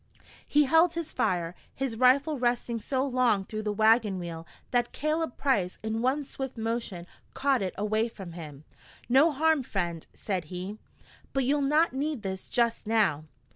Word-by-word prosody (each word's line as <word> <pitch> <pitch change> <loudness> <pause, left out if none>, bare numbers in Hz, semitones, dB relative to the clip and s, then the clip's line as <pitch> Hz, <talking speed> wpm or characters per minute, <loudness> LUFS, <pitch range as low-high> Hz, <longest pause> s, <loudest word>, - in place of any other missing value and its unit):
He 295 0 +4
held 325 +4 +4
his 335 -2 -4
fire, 175 -2 0 0.2
his 265 -4 -2
rifle 265 +4 +3
resting 240 -1 0
so 260 +4 -1
long 245 -7 +2
through 215 +1 -5
the 210 -1 -1
wagon 220 -1 +3
wheel 170 -2 -6 0.2
that 240 -1 +1
Caleb 305 -2 -1
Price 210 -11 +1
in 220 +1 -2
one 265 +4 +1
swift 265 -2 -6
motion 225 -6 -3 0.3
caught 270 -3 +2
it 185 -2 -3
away 215 +3 +1
from 195 -6 -9
him. 155 -4 -9 0.4
"No 270 +7 +5
harm, 315 +1 +2
friend," 175 -8 -3
said 185 -5 -3
he, 185 +6 -6 0.5
"but 270 -1 +1
you'll 285 +3 +2
not 300 +3 +3
need 280 -3 -2
this 190 -1 -5
just 235 -2 +1
now!" 200 -9 +2
235 Hz, 165 wpm, -28 LUFS, 195-275 Hz, 0.5 s, No